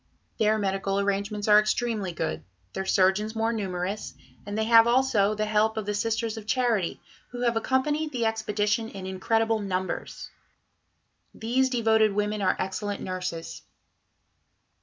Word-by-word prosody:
Their 215 0 +3
medical 195 -1 -1
arrangements 200 +1 -1
are 210 0 +8
extremely 215 -2 -1
good, 80 - -3 0.3
their 190 0 -4
surgeons 195 +4 +2
more 225 +1 0
numerous, 195 -1 -4 0.3
and 205 +1 -4
they 220 - +1
have 230 +1 +6
also 235 -5 +3
the 215 0 -1
help 215 +1 +1
of 215 - -2
the 210 - -2
Sisters 225 +1 -1
of 215 -1 -9
Charity, 230 -8 0 0.3
who 245 0 -7
have 235 -1 +1
accompanied 295 +6 0
the 240 -4 -1
expedition 220 0 0
in 195 -3 -8
incredible 225 +4 0
numbers. 185 -2 -4 1.0
These 255 +4 +1
devoted 220 -4 +3
women 210 +1 -1
are 185 -1 +2
excellent 200 +2 -3
nurses." 180 -3 -5
215 Hz, 140 wpm, -26 LUFS, 195-225 Hz, 1.0 s, are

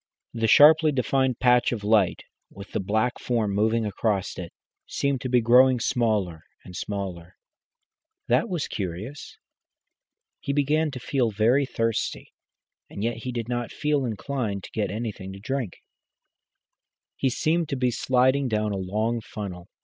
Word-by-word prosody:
The 115 -1 0
sharply 155 +5 +7
defined 130 -2 +1
patch 125 -1 +3
of 110 -4 -4
light, 105 -3 +2 0.3
with 100 -1 -12
the - - -1
black 110 +5 0
form 115 -4 -1
moving 110 +2 +1
across 105 -2 -1
it, 85 -2 -7 0.4
seemed 140 -2 -1
to 130 - -3
be 125 -1 +3
growing 125 +2 +5
smaller 105 -9 0 0.2
and 90 - -10
smaller. 95 -2 -5 0.9
That 235 - +2
was 175 -5 -2
curious. 100 +9 -6 1.0
He 140 - -3
began 150 +2 +1
to 130 -3 -7
feel 125 -1 0
very 115 +7 +2
thirsty, 115 -2 -2 0.6
and 100 - -6
yet 115 0 -1
he 125 +2 -5
did 120 -2 -4
not 120 -1 -3
feel 150 -2 0
inclined 110 -3 -3
to - - -10
get 105 -3 -1
anything 105 -2 -5
to 95 - -10
drink. 125 -3 -4 1.3
He 135 - 0
seemed 160 +5 0
to 140 - -1
be 125 -1 +1
sliding 130 +3 +2
down 105 -2 0
a 100 - -2
long 110 +5 -1
funnel. 95 -5 -7
115 Hz, 150 wpm, -25 LUFS, 105-130 Hz, 1.3 s, sharply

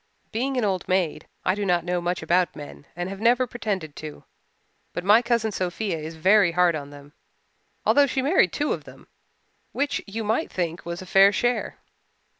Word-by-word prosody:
Being 260 +4 -1
an 240 - +1
old 190 -3 -1
maid, 185 -4 0 0.2
I - - +3
do 205 +1 -3
not 175 -3 +1
know 180 0 -1
much 175 -1 -2
about 175 +2 +1
men 145 -1 -10
and 175 +1 -3
have 195 0 -7
never 245 +3 +4
pretended 200 -10 -4
to, 155 -1 -8 0.7
but 175 - -4
my 210 +4 +6
cousin 235 -2 0
Sophia 185 -1 -2
is 160 +1 -7
very 190 +2 +4
hard 180 -1 +3
on 145 -2 -5
them, 145 0 -14 0.7
although 285 0 +5
she 265 0 -1
married 280 - +3
two 295 - -1
of - - -7
them, - - -14 0.7
which 285 +1 -1
you 220 +3 -4
might 220 +9 -1
think 170 -2 -3
was 170 +2 -5
a - - -11
fair 195 +2 +6
share. 245 +3 -1
185 Hz, 190 wpm, -24 LUFS, 170-225 Hz, 0.7 s, my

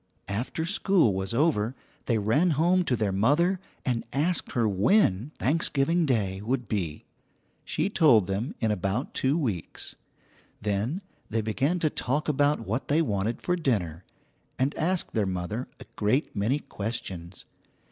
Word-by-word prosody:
After 120 +10 -2
school 185 - +3
was 95 0 -2
over, 125 -3 +1 0.3
they 115 - +2
ran 115 - +2
home 180 +3 +4
to 125 - +1
their 105 -3 0
mother, 150 - +3 0.3
and 120 -3 0
asked 160 +5 0
her 115 -3 +2
when 105 - +3
Thanksgiving 160 +2 +2
Day 100 -7 0
would 120 +3 -1
be. 85 -8 -3 0.6
She 155 +4 0
told 150 - +5
them 100 +6 -3
in 110 -2 +1
about 105 - -2
two 135 +4 +1
weeks; 110 - -3 0.6
then 105 - -1 0.3
they 115 0 0
began 135 +10 0
to 155 - +3
talk 145 +5 -1
about 145 -2 +2
what 115 +4 -3
they 155 +3 +3
wanted 105 -2 -1
for 180 - +1
dinner, 95 - -1 0.5
and 135 +3 +1
asked 180 +3 -1
their 105 -3 +1
mother 95 +7 -3
a - - -10
great 110 +8 +1
many 110 +7 +1
questions. 95 - -6
120 Hz, 145 wpm, -27 LUFS, 100-155 Hz, 0.6 s, told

